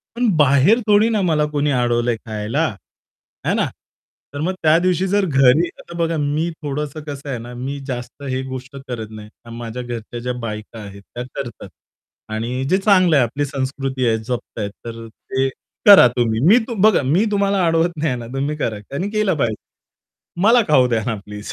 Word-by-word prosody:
पण 245 0 +1
बाहेर 145 - +5
थोडी 210 +2 +5
ना, 215 -3 +1
मला 155 -4 +2
कोणी 145 0 0
अडवलय 120 -1 +1
खायला, 110 -1 -2 0.8
है - - +2
ना. - - +2 0.7
तर 145 - -5
मग 185 +4 0
त्यादिवशी 175 +3 +3
जर 200 0 +2
घरी 135 +2 +4
आता 170 - -11
बघा 165 -1 0
मी 150 +4 0
थोडंसं 150 +1 -4
कसं 145 -1 -7
आहे 125 - -2
ना, 120 +1 -9
मी 135 +3 -5
जास्त 125 +2 -6
हे 130 0 -1
गोष्ट 130 +1 -7
करत 115 -3 -5
नाही 105 -1 -10 0.2
आणि 115 0 -9
माझ्या 120 +1 -5
घरच्या 120 0 -6
ज्या 125 +1 -3
बायका 110 0 -6
आहेत, 100 -1 -10
त्या 120 - -3
करतात. - - -6 0.6
आणि 120 +4 -3
जे 190 - +4
चांगलं 185 -5 +4
आहे, 135 - +5
आपली 145 +5 -2
संस्कृती 135 -1 -3
आहे, 110 -1 +2
जपताय, 110 -2 -4 0.2
तर 115 0 -7
ते 130 +4 -2 0.4
करा 195 -11 +10
तुम्ही. 115 -2 +1
मी 220 +5 +7
तु 235 - -4
बघा 215 -8 +5
मी 170 +12 +2
तुम्हाला 200 -2 +2
अडवत 165 +1 +2
नाही 155 0 0
आहे 125 - -1
ना, 115 - -8
तुम्ही 140 +3 -2
करा, 110 -7 -2
त्यांनी 180 +9 -3
केलं 215 -5 +1
पाहिजे. 115 -5 0 0.9
मला 235 +2 +6
खाऊ 130 -4 +5
द्या 115 -3 0
ना, 115 -3 -1
प्लीज 105 0 -7
135 Hz, 185 wpm, -20 LUFS, 120-165 Hz, 0.9 s, करा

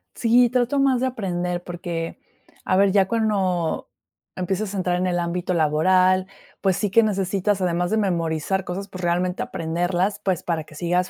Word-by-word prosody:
Sí, 240 +1 +4
trato 250 +3 +1
más 265 -3 +3
de 260 - +2
aprender 180 -7 -3
porque 170 -2 -5 0.5
a 185 - +2
ver, 195 0 +4
ya 195 -1 +3
cuando 195 -7 0 0.5
empiezas 190 +3 -2
a 200 - -3
entrar 180 -1 0
en 185 - 0
el 175 -1 0
ámbito 175 +1 -2
laboral, 185 +4 +3 0.3
pues 190 -2 +2
sí 210 - 0
que 230 +3 +5
necesitas, 195 -1 0
además 175 0 0
de 220 - +2
memorizar 175 -1 0
cosas, 195 +3 -5
pues 185 -2 -9
realmente 180 +1 0
aprenderlas, 175 +4 -1
pues 185 -4 0
para 165 -2 -1
que 155 - -16
sigas 180 +3 0
185 Hz, 175 wpm, -23 LUFS, 175-200 Hz, 0.5 s, que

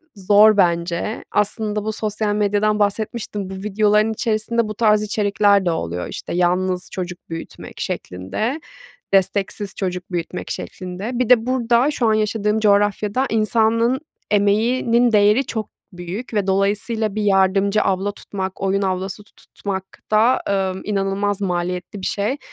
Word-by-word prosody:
zor 205 +2 +5
bence. 170 +2 0
Aslında 210 0 0
bu 220 - -1
sosyal 210 -1 -2
medyadan 210 +1 +1
bahsetmiştim. 205 -1 -2
Bu - - -6
videoların 210 +2 +2
içerisinde 225 0 0
bu 215 - -5
tarz 210 -1 +3
içerikler 205 -1 +2
de 175 - +2
oluyor, 90 - -3
işte, - - -6
yalnız 180 +1 0
çocuk 180 -1 -6
büyütmek 165 0 -8
şeklinde, 215 - -3 0.5
desteksiz 195 +1 0
çocuk 180 -1 -4
büyütmek 175 +1 -4
şeklinde. 185 +5 -5
Bir 250 -1 -1
de 235 -3 +5
burada, 250 +1 +2
şu 250 -5 0
an 220 - +4
yaşadığım 215 0 0
coğrafyada 205 +3 +2
insanın 225 +3 +2 0.3
emeğinin 230 +4 +3
değeri 210 +5 +4
çok 220 -3 -4 0.2
büyük 180 +8 -7
ve 205 -2 0
dolayısıyla 205 +2 0
bir 215 - -1
yardımcı 195 +1 +3
abla 195 +1 0
tutmak, 190 -2 -6
oyun 195 +1 +1
ablası 190 +2 -3
tutmak 200 -2 -6 0.3
da, 225 +4 +4 0.3
ımm, 185 - -7
inanılmaz 200 0 -1
maliyetli 180 +1 -3
bir - - -4
şey. 210 +7 -1
205 Hz, 135 wpm, -20 LUFS, 190-220 Hz, 0.5 s, zor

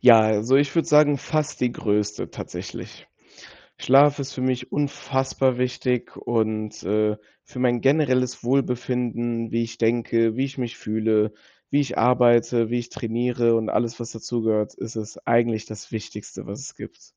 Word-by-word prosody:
Ja, 115 -3 +8
also, 110 +4 +3
ich 140 +1 +2
würde 165 - +1
sagen 150 -1 +5
fast 150 +1 -2
die 125 -1 +1
Größte 105 -1 -1
tatsächlich. - - -8 0.7
Schlaf 140 +3 +5
ist 135 -1 -5
für 130 - -6
mich 130 -1 -1
unfassbar 135 -2 0
wichtig 125 -1 -1
und, 110 -2 -2
äh, 105 +1 +1 0.3
für - - -11
mein 120 -1 +2
generelles 130 -3 +2
Wohlbefinden, 120 -3 -1
wie 115 - +1
ich 115 0 -9
denke, 115 0 +1
wie 130 - +1
ich 135 - -10
mich 125 -1 -4
fühle, 110 0 +1 0.4
wie 145 - +3
ich 140 - -2
arbeite, 120 -2 +4
wie 120 - +1
ich 120 0 -5
trainiere 120 0 0
und 110 -1 -1
alles, 115 -1 -1
was 115 - -6
dazu 115 +1 -4
gehört, 110 -1 0
ist 115 - -8
es 110 0 -6
eigentlich 115 -2 +2
das 110 -1 -10
Wichtigste, 105 -1 -7
was - - -7
es - - -9
gibt. - - -11
120 Hz, 165 wpm, -23 LUFS, 110-130 Hz, 0.7 s, Ja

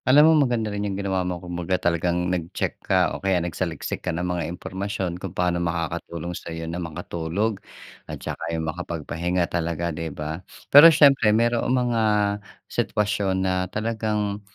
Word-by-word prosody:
Alam 150 +5 +7
mo, 145 -5 +4
maganda 110 -3 -1
rin 100 - -3
'yung 100 -2 -2
ginawa 95 -2 -1
mo. 90 -1 -2
Kumbaga, 90 +1 -2
talagang 85 0 0
nag-check 85 -2 -3
ka - - +2
o - - -6
kaya 95 -1 +2
nagsaliksik 85 -2 -3
ka - - -3
ng 90 +1 -2
mga 90 -1 -1
impormasyon 95 0 -4
kung 95 - -4
paano 90 -1 0
makakatulong 85 0 -3
sa'yo 80 -1 -6
na 85 +2 -4
makatulog 85 +5 -3 0.5
at - - -5
saka 85 - -5
'yung 80 -1 -2
makapagpahinga 85 +1 -2
talaga, 85 0 -2
'di 80 +1 -4
ba? 75 +3 -5 0.3
Pero 145 +4 +11
siyempre, 140 -7 +5
maroong 115 +3 +2
mga 120 -3 +1 0.6
sitwasyon 100 -2 0
na 95 - +1 0.2
talagang 105 -1 -2
90 Hz, 155 wpm, -24 LUFS, 85-105 Hz, 0.6 s, Pero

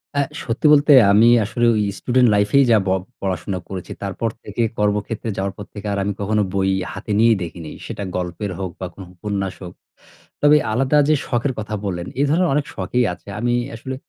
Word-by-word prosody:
অ্যা 140 - +3 0.2
সত্যি 120 +4 -3
বলতে 145 0 +5 0.2
আমি 110 +3 +6
আসলে 120 +3 -1
ঐ - - 0 0.2
স্টুডেন্ট 125 -1 +3
লাইফেই 105 +7 +4
যা 110 - +6
ব - - +1 0.3
পড়াশোনা 95 0 -2
করেছি। 95 -2 -6
তারপর 100 +4 -2
থেকে 105 +3 -4 0.2
কর্মক্ষেত্রে 105 +2 -1
যাওয়ার 95 0 -2
পর 105 - -7
থেকে 105 0 -7
আর - - -2
আমি 100 +1 -1
কখনো 105 +1 +1
বই 95 -1 +1 0.2
হাতে 105 +2 -6
নিয়ে 115 +1 +6
দেখিনি। 80 -1 -7
সেটা 100 - -5
গল্পের 90 +3 -3
হোক 95 -2 -3
বা 95 - -4
কোন - - -12
উপন্যাস 100 0 -3
হোক। 90 - -8 0.7
তবে 145 +1 +7 0.2
আলাদা 135 +5 +2
যে 155 - +5
শখের 125 +2 0
কথা 110 0 -4
বললেন, 90 -3 -3
এ - - +4
ধরনের 170 +4 +2
অনেক 150 - +1
শখেই 120 +7 0
আছে। 90 - -13
আমি 120 0 +1 0.2
আসলে 130 +3 -6
105 Hz, 190 wpm, -20 LUFS, 95-120 Hz, 0.7 s, তবে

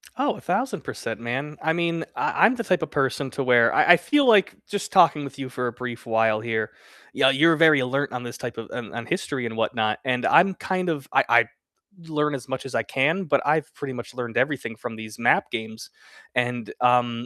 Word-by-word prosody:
Oh, - - 0
1,000%, - - -3
man, 135 +6 -4
I 160 +1 +1
mean, 170 -1 -1
I - - +2
I'm 255 - +3
the 230 - -4
type 185 -4 +1
of 160 - -4
person 135 0 -1
to 140 - -3
where 120 -2 +4
I 175 - +6
I - - +6
feel 285 - +2
like 210 -5 +5
just 205 -1 -4
talking 165 -5 +5
with 140 -1 -9
you 135 -1 -5
for 125 0 -3
a - - -2
brief 120 0 -7
while 110 -1 +2
here, 110 -1 -2 0.4
yeah, 130 - +4
you're 160 +5 +4
very 155 -2 +5
alert 135 +2 -1
on 125 -1 -4
this 120 -1 -7
type 125 -2 -7
of, 115 -3 -7
on 120 -4 -7
on 120 0 -5
history 145 -5 -3
and 115 -1 -5
whatnot, 110 -1 0
and 125 -1 0
I'm 190 +1 +5
kind 185 -1 -2
of 145 -5 -3
I - - +4
I - - +5 0.6
learn 150 -2 0
as 130 0 -8
much 130 0 -5
as 135 - -6
I 115 - +1
can, 145 - 0
but 140 -4 +2
I've 150 +1 0
pretty 135 -2 -6
much 120 0 -8
learned 120 -2 -5
everything 130 -3 -1
from 115 +1 -7
these 110 0 -9
map - - +2
games, 110 0 -6 0.5
and, 120 -2 -1
um, 120 -1 +2
130 Hz, 220 wpm, -24 LUFS, 120-155 Hz, 0.6 s, I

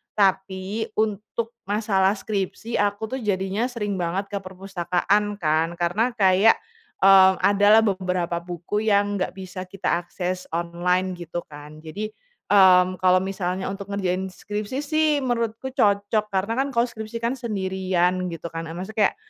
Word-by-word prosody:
tapi 195 +1 0
untuk 215 +2 -2 0.2
masalah 200 -2 +2
skripsi, 205 +3 -3
aku 205 +2 -1
tuh 265 - -2
jadinya 200 +1 -1
sering 210 -6 -3
banget 190 +4 -2
ke 200 - -2
perpustakaan 190 +2 -1
kan, 160 -2 +1
karena 200 +8 0
kayak, 195 +1 +5 0.5
eee, 190 -1 +8
adalah 205 +2 +5
beberapa 180 -3 -1
buku 180 +5 -3
yang 205 -1 +2
nggak 185 - -2
bisa 185 -1 -7
kita 185 -2 -1
akses 180 +1 -4
online 175 +2 0
gitu 175 0 -5
kan. 150 +1 -11
Jadi, 190 +7 -5 0.4
mmm, 185 -2 +6
kalau 185 0 +5
misalnya 190 -1 -3
untuk 200 0 -6
ngerjain 190 -2 -1
skripsi 210 +7 -4
sih 310 +1 +1 0.2
menurutku 235 0 -2
cocok, 205 -1 +2
karena 195 +4 0
kan 275 - +1
kalau 235 - +4
skripsi 220 0 -7
kan 235 +2 +1
sendirian 190 -5 0
gitu 165 -1 -6
kan, 165 0 -5
eee, 165 - -7
maksudnya 200 +5 -7
kayak - - -19
195 Hz, 145 wpm, -24 LUFS, 180-210 Hz, 0.5 s, eee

